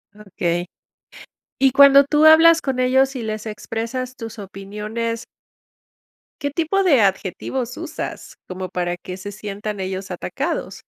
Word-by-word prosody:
Okey. 175 -4 -3 0.9
Y 270 0 +4
cuando 280 +1 +8
tú 300 +2 +2
hablas 325 +1 +8
con 265 -2 -2
ellos 265 +1 +2
y 245 - -4
les 215 0 -4
expresas 230 +4 -5
tus 225 -1 -8
opiniones 210 +4 -5 1.2
¿qué 285 - -1
tipo 330 +6 0
de 290 - +4
adjetivos 230 +6 -1
usas - - -6
cómo 185 0 -6
para 175 -1 -2
que 180 +1 -8
se 205 +2 -7
sientan 210 0 -6
ellos 190 +1 -4
atacados? - - -4
225 Hz, 130 wpm, -21 LUFS, 195-270 Hz, 1.2 s, cuando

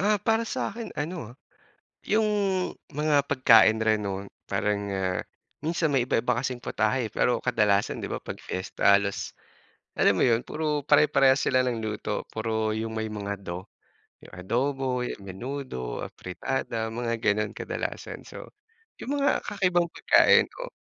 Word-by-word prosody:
Ah, 205 +2 +3
para 225 +1 +1
sa'kin 230 0 -4
ano 150 -6 -4
ah, - - -19 0.7
'yung 215 +1 +2 0.6
mga 150 -1 +2
pagkain 115 -5 +6
rin 110 -1 +2
'no, 100 0 -4 0.2
parang 100 -1 -1
ah 95 -1 -1 0.4
minsan 165 0 +1
may 130 -3 +3
iba-iba 125 -1 +1
kasing 130 -2 -3
putahe 110 +1 0
pero 125 - +2
kadalasan 105 -5 +1
'di - - -4
ba, - - -1
'pag - - -7
fiesta 100 +2 +2
halos, 100 -1 -3 0.7
alam - - +4
mo - - +3
'yun, 115 -2 +3
puro 150 -1 -1
pare-parehas 140 -3 +5
sila 130 -1 +3
ng 115 -3 -2
luto, 105 -1 -3
puro 110 -1 -1
'yung 110 +1 -3
may 110 0 -2
mga 100 -1 -5
"do," 90 +2 -6 0.6
'yung - - -15
adobo, 125 +5 -1 0.2
menudo, 100 - -5
afritada, 110 +3 -4
mga 115 0 -2
gano'n 105 0 +1
kadalasan, - - -5
so - - -10 0.5
'yung 285 +2 -2
mga 280 +1 +1
kakaibang 175 -4 +1
pagkain - - +5
ko. - - -8
120 Hz, 145 wpm, -27 LUFS, 105-145 Hz, 0.7 s, pagkain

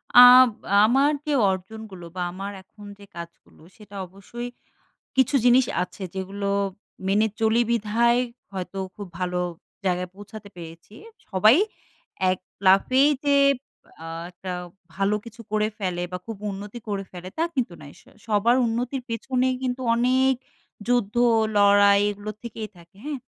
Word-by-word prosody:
আব 250 +1 +10 0.4
আমার 270 +5 +4
যে, 300 - -1 0.2
অর্জনগুলো, 190 -1 -7
বা 180 - -3
আমার 195 +3 -6
এখন 205 +2 -16
যে, 200 - -13
কাজগুলো 170 0 -11 0.2
সেটা 210 -2 -14
অবশ্যই 215 +6 -8 0.7
কিছু 260 +2 +3
জিনিস 250 +1 +6 0.2
আছে, 185 +2 -9
যেগুলো 195 +1 -4 0.6
মেনে 210 +3 +3
চলি 225 +1 +3
বিধায় 235 +2 +2 0.3
হয়তো 190 +1 -5 0.2
খুব 205 -2 -8
ভালো 180 -1 -1 0.5
জায়গায় 180 -1 0
পৌঁছাতে 205 +1 -11
পেরেছি। 170 +3 -11 0.3
সবাই 215 +4 +5 0.8
এক 185 - -2 0.3
লাফেই 255 +9 +5 0.2
যে, 285 0 +4 0.7
আ - - -7 0.2
একটা 180 +1 -6 0.4
ভালো 195 +2 +1
কিছু 230 0 -11
করে 215 0 +2
ফেলে, 180 -3 -2
বা 180 - -3
খুব 225 -2 -6
উন্নতি 205 +4 -8
করে 200 -1 -2
ফেলে 180 0 -8
তা 325 - +2
কিন্তু 240 -9 -1
নয়। 145 0 -12 0.3
সবার 220 +3 +3
উন্নতির 245 +3 -2
পেছনে 250 +3 0
কিন্তু 255 0 -2
অনেক 260 +2 +3 0.5
যুদ্ধ 240 -3 +1 0.4
লড়াই 200 0 +6
এগুলো 205 +1 -5
থেকেই 225 -2 -7
থাকে। 170 +3 -19
হ্যাঁ? 295 -3 -4
210 Hz, 135 wpm, -24 LUFS, 190-240 Hz, 0.8 s, আব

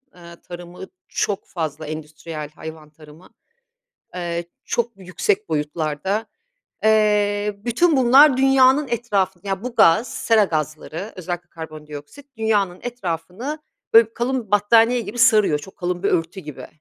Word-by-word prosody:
ııı, 170 -1 -14
tarımı 175 +1 -10 0.2
çok 200 -2 -2
fazla 155 -3 -5
endüstriyel 155 0 -7
hayvan 155 0 -10
tarımı, 155 +3 -17 0.9
ııı, 170 -1 -3 0.2
çok 235 0 -1
yüksek 190 +2 -2
boyutlarda. 155 +6 -2 0.6
Eee, 210 -1 +2
bütün 295 +6 +3
bunlar 265 +2 +6
dünyanın 270 +1 +4
etrafını 200 -5 -1
Ya, 195 +1 -2
bu 250 -1 -5
gaz, 220 +7 +4
sera 225 -2 +3
gazları 155 +4 -4
özellikle 175 -1 -6
karbondioksit, 155 - -10
Dünya'nın 205 -5 0
etrafını 235 - -5 0.3
böyle 225 0 +8
bir - - -37
kalın 240 -3 -2
battaniye 230 +4 +4
gibi 215 +3 -7
sarıyor, 215 -10 +4
çok 190 +6 -13
kalın 180 0 -3
bir - - +2
örtü 170 +3 -1
gibi. 150 -5 -9
190 Hz, 130 wpm, -21 LUFS, 165-230 Hz, 0.9 s, böyle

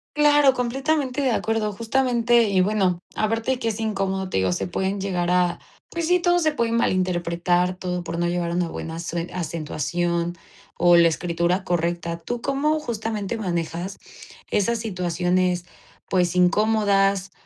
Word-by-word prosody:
Claro, 295 -2 +5
completamente 265 +2 -1
de 265 - +2
acuerdo. 220 -1 0
Justamente 240 +1 +2
y 190 -2 +3
bueno, 190 -3 +1 0.2
aparte 225 +3 0
de 255 - -1
qué 230 - -2
es 225 -1 -2
incómodo, 195 -3 -2
te - - -1
digo, 95 -1 +1
se 90 - -2
pueden 190 +2 -2
llegar 180 -3 -1
a 180 -1 +2 0.3
pues 335 -1 -3
sí, 360 +1 +4
todo 350 0 +3
se 315 -2 +2
puede 235 -6 -1
malinterpretar, 180 -3 +1
todo 180 -1 -4
por 170 0 -4
no 175 - +1
llevar 175 -1 -1
una 175 0 0
buena 165 0 -6
asue 170 0 -4
acentuación 170 +1 -2 0.4
o 175 0 +5
la 170 - +6
escritura 170 +2 0
correcta. 170 -1 -1
¿Tú 235 +8 -5
cómo 280 +4 +1
justamente 225 -5 -3
manejas 175 -1 -3 0.5
esas 230 +3 +1
situaciones, 180 -3 0 0.4
pues, 180 -1 +1
incómodas? 195 0 +2
190 Hz, 150 wpm, -23 LUFS, 175-230 Hz, 0.5 s, la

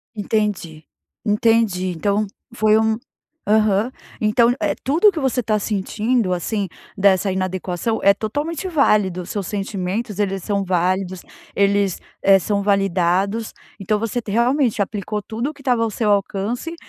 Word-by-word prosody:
Entendi, 205 -7 -2 0.4
entendi, 210 -3 +2
então 205 +5 0 0.3
foi 215 -2 +3
um 220 0 +2 0.5
aham, 215 +1 +3 0.3
então 230 +3 +3
é - - 0
tudo 320 +10 +3
o - - +7
que 335 - -4
você 265 -1 +1
tá 215 -2 0
sentindo 210 +1 -1
assim 200 +3 -2 0.3
dessa 195 0 +3
inadequação 185 +3 -2
é 200 - +7
totalmente 290 - -3
válido 210 - +2
seus 195 0 -4
sentimentos, 200 +1 -3
eles 195 -2 -1
são 200 -1 -1
válidos, 185 0 0 0.3
eles, 200 -2 +2 0.2
eh, 195 0 +6
são 200 +2 -1
validados. 195 +2 +1 0.3
Então 205 +2 0
você 230 +3 -2
realmente 235 +2 +2
aplicou 210 +1 -3
tudo 235 +8 -4
que 285 - -17
estava 250 -4 +1
ao 225 - 0
seu 215 0 0
alcance, 205 - -1
210 Hz, 140 wpm, -20 LUFS, 195-230 Hz, 0.5 s, o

